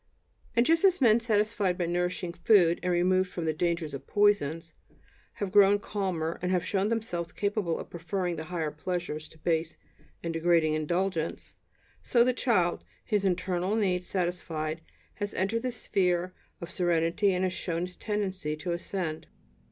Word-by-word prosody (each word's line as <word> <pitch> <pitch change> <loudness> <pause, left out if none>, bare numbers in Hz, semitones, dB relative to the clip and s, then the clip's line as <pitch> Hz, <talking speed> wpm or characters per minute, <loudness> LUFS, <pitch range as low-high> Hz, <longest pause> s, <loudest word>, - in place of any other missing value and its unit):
And 235 +1 +4
just 330 +4 +3
as 375 -2 +5
men 235 -4 +5
satisfied 210 -4 +1
by 175 - 0
nourishing 175 0 -1
food 175 -1 +4
and 180 - 0
removed 185 +1 +2
from 175 -2 -4
the 160 - +1
dangers 170 -2 -1
of 140 - -7
poisons, 165 -6 +2 0.6
have 200 -2 -4
grown 205 0 +6
calmer, 185 -6 -3
and 180 0 -1
have 180 -2 +1
shown 200 +1 0
themselves 210 -7 -2
capable 200 -5 -1
of - - -8
preferring 175 +1 -2
the 160 0 -6
higher 160 -3 -2
pleasures 155 -1 -4
to - - -18
base 160 0 -1 0.5
and 165 -1 -2
degrading 165 -1 +3
indulgence, 165 +2 -2 0.5
so 235 -1 +4
the 255 +1 +2
child, 195 -9 +1 0.2
his 210 -3 +1
internal 185 +1 0
needs 180 -4 0
satisfied, 170 -4 -2 0.4
has 205 -1 -4
entered 205 +5 0
the 255 +1 -2
sphere 180 -5 0 0.3
of 170 - -6
serenity 175 +3 +2
and 180 0 0
has 185 -1 0
shown 170 -2 -2
his 180 0 -5
tendency 190 -7 -2
to 165 +3 -4
ascend. 170 -2 -3
180 Hz, 160 wpm, -29 LUFS, 170-200 Hz, 0.6 s, grown